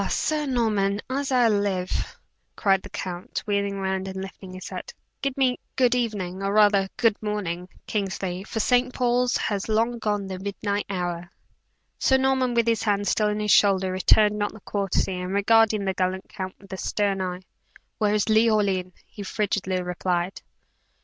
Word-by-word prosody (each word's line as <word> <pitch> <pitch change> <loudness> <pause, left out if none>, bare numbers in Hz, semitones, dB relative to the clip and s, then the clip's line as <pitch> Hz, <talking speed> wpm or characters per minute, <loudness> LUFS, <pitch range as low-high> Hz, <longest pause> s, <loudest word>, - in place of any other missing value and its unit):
Sir 305 -1 0
Norman, 210 -6 +1
as 275 +1 -1
I 250 -2 +5
live!" 200 -4 -1 0.4
cried 195 -2 +2
the - - -11
count 180 -1 -5
wheeling 200 -1 0
round 190 0 -2
and 190 - -6
lifting 190 0 -8
his 185 - -7
hat. 485 - -6 0.3
"Give 275 -1 -2
me 255 -2 +2 0.2
good 250 -2 +3
even 205 -7 -2
or 195 0 0
rather, 205 -2 +4
good 230 -4 +2
morning 185 -4 -3 0.2
Kingsley, 190 -3 -3
for 220 - -4
St. 250 +3 +3
Paul's 245 0 +2
has 205 0 -2
long 230 +2 +1
gone 205 -2 -1
the 190 -1 -5
midnight 200 +1 -2
hour." 175 -2 -3 0.7
Sir 265 - +4
Norman, 265 -2 +1
with 235 -1 +3
his 230 -1 +1
hand 205 -2 0
still 210 +2 +2
on 210 0 -1
his 210 -1 +1
shoulder, 190 -2 +4
returned 210 +3 +4
not 205 - -1
the 220 - -13
courtesy, 195 -2 -1
and 180 +1 -4
regarding 215 0 +4
the 190 - 0
gallant 185 0 -1
count 185 -2 -6
with 195 -1 -12
a - - -4
stern 200 0 0
eye. 180 -1 -3 0.6
"Where 210 -1 +2
is 210 - +1
Leoline?" 210 -5 +2
he 205 - -11
frigidly 195 -2 -1
repeated. 180 +1 -2
205 Hz, 170 wpm, -25 LUFS, 190-225 Hz, 0.7 s, I